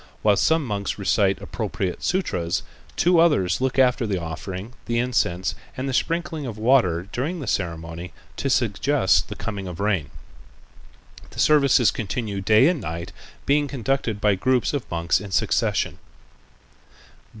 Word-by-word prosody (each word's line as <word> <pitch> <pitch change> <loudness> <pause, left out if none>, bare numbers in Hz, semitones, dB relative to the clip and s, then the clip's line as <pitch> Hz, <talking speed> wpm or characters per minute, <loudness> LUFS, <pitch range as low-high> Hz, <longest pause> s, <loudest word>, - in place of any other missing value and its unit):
While 105 -1 +5
some 160 +7 +2
monks 100 -4 -3
recite - - +2
appropriate 90 -2 -3
sutras, 90 - -1 0.3
two 175 -1 +4
others 140 - +3
look 130 0 0
after 125 -2 +3
the 95 -3 -1
offerings, 90 +6 -6
the 115 - 0
incense, 115 -7 0 0.2
and 130 +1 -3
the 135 - -2
sprinkling 165 0 -1
of 110 -3 -6
water 110 -7 +2
during 155 +8 -2
the 140 - -5
ceremony 85 -3 -3 0.3
to - - -1
suggest - - +2
the - - -5
coming 100 -4 -5
of 90 -2 -7
rain. 100 -8 0 1.2
The - - -11
services 140 -5 +5
continue 105 -2 -3
day 110 +7 +5
and 170 -5 +1
night, 85 0 -5 0.3
being 145 +1 +2
conducted 135 -4 -2
by 105 -1 +3
groups 125 +9 +1
of 140 -4 -3
monks 85 +3 0
in 100 - -8
succession. 95 - 0
110 Hz, 145 wpm, -23 LUFS, 95-135 Hz, 1.2 s, While